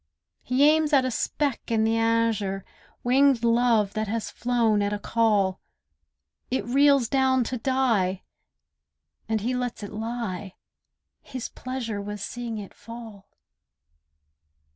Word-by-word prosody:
He 265 +3 +3
aims 310 0 +3
at 270 -2 +5
a 255 - -1
speck 280 +2 -2
in 225 -1 +2
the 225 +1 +2
azure; 225 -4 +1 0.4
Winged 260 0 +4
love, 230 -3 +3
that 215 0 -2
has 225 +1 -3
flown 230 -4 +1
at 205 0 0
a 210 - -1
call; 205 -4 +1 0.9
It 260 - -1
reels 275 0 +4
down 260 0 +2
to 250 +2 -3
die, 225 -8 +1 1.1
and 220 -1 0
he 245 +4 -1
lets 245 -3 -3
it 205 - -7
lie; 215 -4 -4 0.7
His 255 -3 -6
pleasure 240 -5 -5
was 205 0 -6
seeing 240 -2 -5
it 205 -2 -8
fall. 225 -4 -11
230 Hz, 130 wpm, -25 LUFS, 210-255 Hz, 1.1 s, at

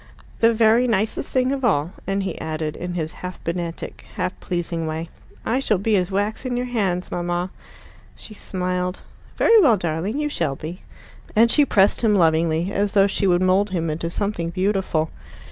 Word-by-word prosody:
"The 230 0 +5
very 230 +2 +4
nicest 220 +2 -1
thing 255 0 +2
of 275 -1 -2
all." 170 -8 +2 0.2
And 195 0 0
he 185 -4 -4
added, 155 -1 -3
in 180 0 -5
his 160 -1 -3
half 180 0 -6
pedantic, 170 0 -4
half 185 -3 -1
pleasing 170 -2 -3
way, 160 +1 -4 0.4
"I 245 +4 +1
shall 220 -6 +2
be 210 +3 +1
as 180 -2 +1
wax 205 +4 -1
in 250 -2 -2
your 250 - -1
hands, 195 -7 -1
mamma." 175 +1 -2 0.6
She 215 - -10
smiled. 180 -2 -3 0.3
"Very 455 -1 +6
well, 245 - +5
darling. 175 - -2
You 300 0 0
shall 165 - -1
be." 165 +6 -7 0.5
And 230 +2 +5
she 295 - +5
pressed 200 -6 +3
him 220 -3 +3
lovingly, 165 0 +2
as 205 0 0
though 195 -2 +5
she 200 0 0
would 180 0 +3
mould 190 +3 +3
him 165 -4 -1
into 165 +2 -3
something 185 -2 -2
beautiful. 185 -3 0
185 Hz, 180 wpm, -22 LUFS, 170-215 Hz, 0.6 s, Very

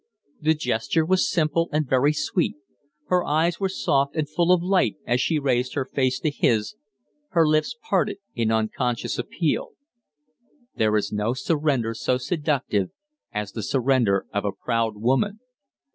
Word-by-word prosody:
The 160 +1 +3
gesture 125 +3 0
was 185 +2 +2
simple 165 0 +1
and 150 -1 0
very 130 +3 +3
sweet; 150 +3 -1 0.5
her 180 -1 +3
eyes 160 +3 +1
were 195 -1 0
soft 140 -6 0
and 155 -2 0
full 170 +4 +1
of 180 -2 +4
light 185 - +2
as 120 +1 +1
she 160 - +1
raised 125 -3 0
her 135 - 0
face 130 -1 0
to 155 - +1
his, 110 - +1 0.6
her 165 -3 +4
lips 155 - +1
parted - - +1 0.2
in 115 -2 0
unconscious 110 +2 -1
appeal. - - -1 1.0
There 110 -1 +2
is 105 - -1
no 105 +4 -1
surrender 135 -5 0
so 125 +2 0
seductive 135 - -1 0.4
as 105 -1 -3
the 110 - -5
surrender 120 -4 +2
of 100 - 0
a 100 - 0
proud 115 0 -1
woman. 135 - +1
135 Hz, 155 wpm, -24 LUFS, 115-160 Hz, 1.0 s, of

